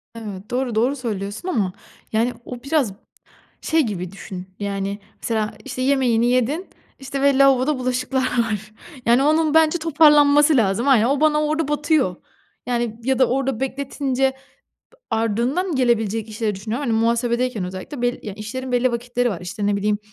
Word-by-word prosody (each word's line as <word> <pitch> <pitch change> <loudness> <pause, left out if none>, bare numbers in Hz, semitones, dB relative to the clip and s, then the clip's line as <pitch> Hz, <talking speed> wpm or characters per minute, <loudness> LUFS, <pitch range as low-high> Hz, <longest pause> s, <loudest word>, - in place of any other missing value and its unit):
Evet, 210 -3 -8
doğru, 250 -2 -1
doğru 245 +6 +2
söylüyorsun 215 - -5
ama, 200 - 0 0.4
yani, 230 +3 +1
o 245 -1 -8
biraz 275 -7 +1 0.7
şey 320 0 +2
gibi 185 -6 -4
düşün, 185 -2 -8
yani, 200 0 -3 0.2
mesela, 220 -2 -1
işte, 255 -1 -5
yemeğini 255 -4 +2
yedin, 265 +9 0 0.3
işte, 270 0 -4
ve 280 -1 +4
lavaboda 275 +1 +4
bulaşıklar 255 +1 -1
var. 220 -5 -1 0.3
Yani, 240 +3 +4
onun 310 +1 +3
bence 320 +1 +4
toparlanması 295 -2 +5
lazım. 220 +3 +1
Aynen, 245 -5 +5
o 275 +3 +1
bana 305 -1 +3
orada 305 0 0
batıyor. 295 - +1 0.5
Yani, 235 -2 -2
ya 265 +1 +1
da 260 - +6
orada 270 -2 -1
bekletince 270 0 -2
b - - -23 0.7
ardından 235 - 0
gelebilecek 225 -4 +1
işleri 215 -1 -2
düşünüyorum. 225 +8 -4
Hani, 235 - 0
muhasebedeyken 235 -1 0
özellikle 185 +9 -7
bel 245 0 0
ya, 210 - -6
işlerin 250 +5 -6
belli 245 0 +2
vakitleri 245 +1 -1
var. 185 - -5
İşte, 200 +4 -4
ne 205 0 +2
bileyim, 205 +1 0
245 Hz, 160 wpm, -21 LUFS, 215-275 Hz, 0.7 s, da